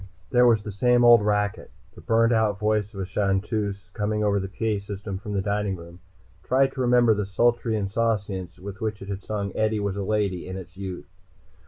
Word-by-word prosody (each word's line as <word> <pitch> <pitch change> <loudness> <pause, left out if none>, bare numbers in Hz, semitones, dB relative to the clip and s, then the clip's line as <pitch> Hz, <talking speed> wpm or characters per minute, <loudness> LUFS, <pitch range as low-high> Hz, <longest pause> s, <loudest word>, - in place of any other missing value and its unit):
There 125 0 +5
was 110 -3 +3
the 105 - -5
same 120 +5 +3
old 120 -2 +8
racket. 105 0 -1 0.2
The - - -13
burnt 115 +1 +3
out 110 -3 +2
voice 105 -1 0
of 100 - -9
a - - -2
chanteuse, 100 0 -1
coming 105 0 -1
over 100 -1 +2
the 95 - -3
PA 105 0 -2
system 100 -1 -6
from 105 0 -6
the 100 -1 0
dining 100 -1 -1
room, 85 0 -12 0.4
tried 135 +1 +2
to 135 - -4
remember 120 -2 +4
the 105 -2 -2
sultry 115 +3 +1
insouciance 100 -3 -2
with 100 +4 -9
which 110 -2 -3
it 100 - -10
had 100 -1 -4
sung 100 -2 -4
"Eadie 110 0 +1
was 100 -1 -2
a - - -2
Lady" 100 -4 -1
in 95 +1 -5
its 95 0 -10
youth. 95 -6 -6
105 Hz, 205 wpm, -25 LUFS, 95-110 Hz, 0.4 s, old